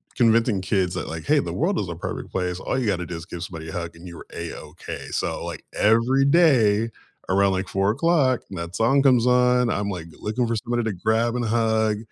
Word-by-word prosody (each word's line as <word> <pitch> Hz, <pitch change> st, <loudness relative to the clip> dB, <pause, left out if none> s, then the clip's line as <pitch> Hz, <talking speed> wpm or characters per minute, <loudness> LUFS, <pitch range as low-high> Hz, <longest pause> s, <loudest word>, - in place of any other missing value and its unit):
convincing 115 Hz, -4 st, +3 dB
kids 95 Hz, -1 st, 0 dB
that, -, -, -4 dB
like, 80 Hz, 0 st, -6 dB
"Hey, -, -, +4 dB
the -, -, -3 dB
world -, -, 0 dB
is -, -, -3 dB
a -, -, -4 dB
perfect -, -, -6 dB
place. 90 Hz, -1 st, -2 dB
All 130 Hz, -, -2 dB
you 125 Hz, -, -1 dB
gotta 90 Hz, -3 st, 0 dB
do 85 Hz, 0 st, -6 dB
is 80 Hz, +1 st, -7 dB
give 85 Hz, 0 st, -7 dB
somebody 80 Hz, -4 st, -7 dB
a -, -, -7 dB
hug 85 Hz, -1 st, -5 dB
and 90 Hz, +2 st, -11 dB
you're 85 Hz, -, -10 dB
A-okay." 85 Hz, -1 st, -7 dB
so, -, -, -2 dB
like, -, -, -6 dB
every 115 Hz, +5 st, +3 dB
day 120 Hz, -9 st, +4 dB, 0.4 s
around, 100 Hz, +1 st, +3 dB
like, 95 Hz, 0 st, -2 dB
4:00 130 Hz, -, +2 dB
and 95 Hz, -, -7 dB
that 85 Hz, +2 st, -6 dB
song 135 Hz, +5 st, +3 dB
comes 125 Hz, -3 st, +4 dB
on, 125 Hz, -1 st, +3 dB
I'm, 100 Hz, -1 st, -1 dB
like, 90 Hz, -4 st, -5 dB
looking 115 Hz, +3 st, -1 dB
for 115 Hz, -, -1 dB
somebody 120 Hz, +1 st, -1 dB
to 110 Hz, -, -1 dB
grab 115 Hz, +6 st, 0 dB
and 120 Hz, -, -1 dB
hug. 110 Hz, -1 st, +1 dB
110 Hz, 220 wpm, -23 LUFS, 90-120 Hz, 0.4 s, Hey